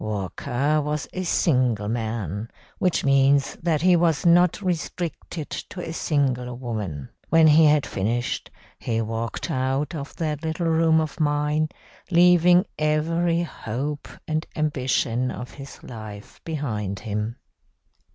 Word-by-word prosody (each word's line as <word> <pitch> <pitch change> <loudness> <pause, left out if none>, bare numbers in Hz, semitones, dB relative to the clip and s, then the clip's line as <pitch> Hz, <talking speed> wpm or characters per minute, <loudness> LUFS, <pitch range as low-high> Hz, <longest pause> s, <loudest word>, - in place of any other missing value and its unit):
Walker 120 +8 -1
was 150 0 -2
a 185 - -3
single 125 - +2
man, 110 -2 -3 0.3
which 180 -5 +1
means 140 0 +4
that 160 -2 +1
he 180 -1 +6
was 165 -2 +2
not 175 +2 +5
restricted 170 -3 -4
to 185 - -6
a 165 - -4
single 130 -6 0
woman. 105 - -4 0.2
When 165 0 +6
he 155 +1 +7
had 150 -1 +4
finished, 115 +5 -2 0.3
he 115 -1 -1
walked 115 +1 -3
out 130 +3 -1
of 145 -3 -6
that 155 -3 -2
little 160 +2 -2
room 160 0 +4
of 155 +1 -3
mine, 150 +1 +1 0.4
leaving 180 +1 +5
every 165 +3 +1
hope 145 0 -4 0.2
and 155 0 0
ambition 130 -5 0
of 125 0 -6
his 140 -1 -11
life 110 -4 -10
behind 110 - -3
him. 105 +1 -3
145 Hz, 130 wpm, -24 LUFS, 120-160 Hz, 0.4 s, he